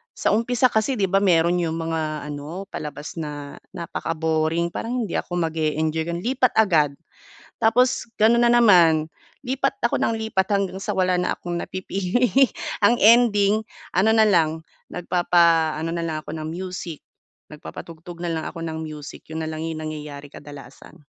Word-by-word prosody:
sa - - 0
umpisa 245 +3 +2
kasi 220 +4 +1
'di 200 -6 0
ba 195 - +3
mayro'n 175 -3 +3
'yong 160 - -2
mga 160 -2 -3
ano 155 +7 -7
palabas 150 0 -7
na 145 -3 -6 0.2
napaka-boring, 165 -1 -1
parang 230 +7 -5
hindi 210 -6 -2
ako 175 0 -3
mag-eenjoy 160 0 -1
ganon 170 +1 -4
lipat 255 +2 +1
agad. 160 -10 +3 0.6
Tapos, 245 +2 +2 0.2
gano'n 235 +2 +5
na 235 - +4
naman 165 -7 +5 0.3
lipat 270 +1 -2
ako 235 - +1
nang - - 0
lipat 220 -3 -1
hanggang 195 -1 0
sa 205 +2 -3
wala 185 -1 +1
na 180 - 0
akong 175 -1 -5
napipili 190 +6 -1 0.6
ang 235 - +6
ending 215 -2 +5 0.2
ano 205 +5 +3
na 220 - +5
lang 165 -7 +3 0.3
nagpapaano 170 -3 +2
na 170 0 -2
lang 155 -2 -3
ako - - -13
ng 155 - -5
music, 175 -1 -6 0.5
nagpapatugtog 165 +2 -10
na 175 - -2
lang 160 -1 -3
ako 165 - -6
ng 160 - -5
music 150 -2 -9
'yon 160 - -3
na 160 - -3
lang 160 0 -5
'yong 160 -1 -4
nangyayari 150 -2 -7
kadalasan. 145 +1 -13
170 Hz, 160 wpm, -23 LUFS, 160-205 Hz, 0.6 s, ang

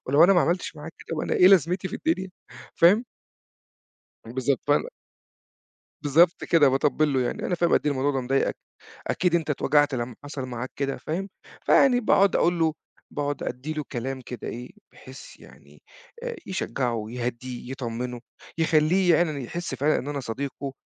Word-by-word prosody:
ولو 140 +5 +6
أنا 195 - +6
ما 175 - +4
عملتش 170 0 -1
معاك 150 +2 -9
كده - - -6
أبقى - - -2
أنا - - 0
إيه 180 - +7
لازمتي 185 0 +3
في - - -7
الدنيا 190 -13 -1 0.5
فاهم؟ 200 +8 +5 1.2
بالضبط 130 +2 -1
فأنا - - +2 1.1
بالضبط 165 +4 +3
كده 150 -5 +5
باطبّل 145 +2 +1
له 130 - +1
يعني، 125 - -2
أنا 180 - 0
فاهم 170 0 +1
قد - - +5
إيه 150 - +3
الموضوع 135 +1 0
ده 135 - -1
مضايقك 135 +2 0 0.5
أكيد 170 +1 0
أنت 160 -3 0
اتوجعت 145 0 +2
لمّا 120 -1 -3
حصل 145 -2 -5
معاك 125 +1 -5
كده 135 -1 -2
فاهم؟ 190 +6 -4 0.3
فيعني 250 -3 +4
باقعد 200 -4 +3
أقول 175 0 +2
له 160 -1 +2 0.4
باقعد 145 -1 -3
أدي 125 +5 -4
له 150 -2 -4
كلام 130 +1 -4
كده 125 -2 -7
إيه 125 +2 -7 0.2
بحيث 130 0 -13
يعني - - -18 0.4
آآ، 485 -1 -4
يشجعه 125 - -2
يهدّيه 125 +1 -5
يطمنه، 125 -1 -4 0.4
يخلّيه 165 +3 +3
يعني 155 -5 0
يحس 175 +8 -5
فعلًا 150 +3 +1
إن 140 - -5
أنا 145 -1 -3
صديقه، 135 +3 -5
145 Hz, 165 wpm, -25 LUFS, 130-170 Hz, 1.2 s, إيه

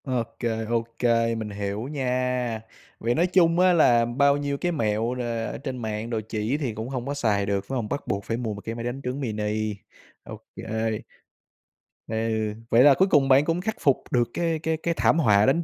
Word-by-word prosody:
OK, 125 -4 -3 0.3
OK, 115 0 -2 0.4
mình 110 -1 -4
hiểu 100 0 -4
nha. 125 -4 -1 0.4
Vậy 120 +1 0
nói 175 +3 +3
chung 175 -2 +3
á 185 0 +5
là 120 -8 +5
bao 140 +4 +3
nhiêu 145 -1 -2
cái 175 +4 -1
mẹo 115 -4 0
là 120 -2 -3
ở - - -6
trên 130 -1 -5
mạng 110 0 -3
đồ 115 -2 -1
chỉ 110 +6 -1
thì 135 -7 -2
cũng 110 +3 -5
hông 125 -2 -4
có 140 - -2
xài 105 -8 +1
được, 100 -1 -1
phải 135 - -4
hông? 115 -4 -2
Bắt 145 - -4
buộc 100 -4 -2
phải 115 - -2
mua 115 -3 -3
một 105 - -8
cái 115 +2 -5
máy 115 - -5
đánh 120 +3 -4
trứng 125 +2 -3
mini, 110 -2 -2 0.5
OK. - - -10 1.7
Ừ, 110 - -4 0.5
vậy 115 +2 +6
là 145 0 +8
cuối 190 +8 +3
cùng 145 -7 +4
bạn 135 +2 +6
cũng 165 +2 0
khắc 220 +4 -2
phục 140 -3 +2
được 120 -2 +2
cái 165 -2 0
cái 160 0 -1
cái 170 +2 -1
thảm 165 - +3
họa 105 -7 +4
đánh 160 +6 +2
125 Hz, 210 wpm, -25 LUFS, 110-145 Hz, 1.7 s, là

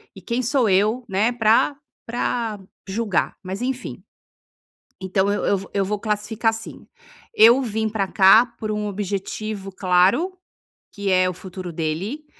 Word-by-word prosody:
e 195 - -11
quem 235 +7 -2
sou 250 -3 +1
eu, 210 +6 +2
né, 210 +6 +1
pra 230 +5 +3 0.3
pra 230 -2 -2 0.3
julgar? 205 0 -1
Mas, 190 +4 -5
enfim, 255 0 -4 1.0
então 190 +1 0
eu 205 - -1
eu - - +1
eu 200 - +3
vou 195 - -11
eu 195 -1 +1
vou 210 +1 -2
classificar 215 +1 -1
assim: 225 0 -7 0.5
eu 235 +5 +7
vim 220 -2 -2
pra 205 -3 -1
cá 195 +5 +6
por 215 -1 -4
um 210 0 -2
objetivo 200 0 -4
claro, 190 - +2 0.6
que 200 -1 -3
é 185 0 +3
o - - -4
futuro 185 -1 -8
dele 175 - -3
210 Hz, 155 wpm, -22 LUFS, 190-230 Hz, 1.0 s, eu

